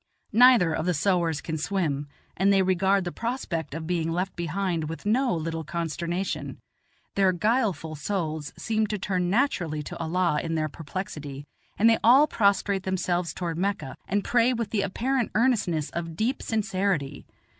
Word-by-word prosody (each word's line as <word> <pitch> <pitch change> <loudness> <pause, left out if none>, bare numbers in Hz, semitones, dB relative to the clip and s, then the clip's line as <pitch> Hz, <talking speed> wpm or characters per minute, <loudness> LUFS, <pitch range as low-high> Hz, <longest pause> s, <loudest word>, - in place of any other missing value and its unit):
Neither 235 -8 +6
of 160 +2 -2
the 180 - +2
sowars 170 -1 +1
can 160 -1 -4
swim, 150 -5 -1 0.3
and 195 +2 +3
they 195 -1 +4
regard 190 +1 +2
the 175 - -4
prospect 190 - -3
of 165 -1 -5
being 165 -1 -1
left 180 +3 -2
behind 170 -2 -2
with 165 - -7
no 245 +4 +2
little 165 0 -3
consternation. 170 +3 -3 0.6
Their 195 -2 +3
guileful 200 -4 0
souls 155 -2 -3
seem 220 -1 0
to 210 - -2
turn 180 -2 -1
naturally 180 - 0
to - - -7
Allah 170 -1 +1
in 165 0 -3
their 155 -1 0
perplexity; 145 -3 -6 0.3
and 225 - +5
they 225 -1 +5
all 260 +6 +7
prostrate 200 -5 +1
themselves 180 -2 -1
toward 170 -2 -4
Mecca, 195 -8 -2
and 205 +1 0
pray 240 +1 +3
with 230 -3 -3
the 210 - +1
apparent 240 +6 0
earnestness 210 - +1
of 165 -1 -4
deep 235 - -1
sincerity. 190 -9 -1
185 Hz, 160 wpm, -26 LUFS, 165-205 Hz, 0.6 s, all